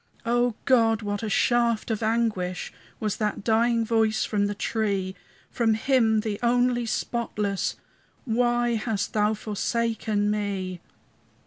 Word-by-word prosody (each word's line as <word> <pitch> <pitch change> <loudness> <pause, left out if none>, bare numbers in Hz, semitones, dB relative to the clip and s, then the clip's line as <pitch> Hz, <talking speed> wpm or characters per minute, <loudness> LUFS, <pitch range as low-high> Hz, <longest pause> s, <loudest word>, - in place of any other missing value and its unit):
O 240 0 +2
God, 225 -4 +3
what 205 -1 -2
a 220 - -3
shaft 235 +1 +2
of 220 - -2
anguish 220 -5 -1 0.3
Was 215 -2 -2
that 210 -2 -2
dying 230 +1 +2
voice 220 -1 +2
from 205 -1 0
the 205 - -3
tree! 200 -3 -1 0.4
From 225 -2 +2
Him 225 -2 +2
the 210 -2 -3
only 245 0 +2
spotless, 210 -4 -2 0.5
"Why 240 0 +1
hast 215 -2 -2
Thou 210 0 +2
forsaken 215 0 -1
me?" 195 -4 -3
220 Hz, 125 wpm, -26 LUFS, 210-235 Hz, 0.5 s, God